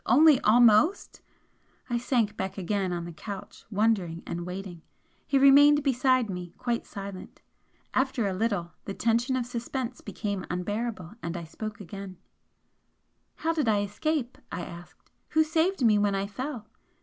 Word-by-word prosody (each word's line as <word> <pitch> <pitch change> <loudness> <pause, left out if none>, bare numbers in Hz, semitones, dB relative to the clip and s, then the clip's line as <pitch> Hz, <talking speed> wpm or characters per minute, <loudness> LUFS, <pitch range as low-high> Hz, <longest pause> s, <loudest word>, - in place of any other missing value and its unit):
Only 295 +1 +7
'almost'! 235 - +4 0.7
I 240 -1 0
sank 235 -4 +1
back 190 0 -4
again 195 0 -1
on 170 -1 -3
the 170 - -8
couch, 195 +5 -8
wondering 200 -6 +1
and 170 +1 -5
waiting. 180 -2 -6 0.5
He 275 - +3
remained 285 +2 +7
beside 255 -2 +2
me 180 -3 -6
quite 240 -1 -2
silent. 195 -1 -8 0.5
After 260 -3 +1
a 195 - 0
little 190 -4 -1
the 195 - -5
tension 235 +3 +1
of 250 -2 -1
suspense 245 +1 -4
became 200 -4 -4
unbearable 205 +1 -3
and 170 +1 -4
I 170 - -5
spoke 215 +7 -7
again 195 -1 -8 1.2
"How 325 +1 -1
did 305 -6 0
I 210 -2 +3
escape?" 250 +5 -2
I 170 - -3
asked 170 +1 -12 0.2
"Who 315 - +4
saved 320 -1 +1
me 210 -2 +5
when 205 -1 +2
I 195 0 -1
fell?" 250 +2 -5
215 Hz, 150 wpm, -28 LUFS, 190-255 Hz, 1.2 s, Only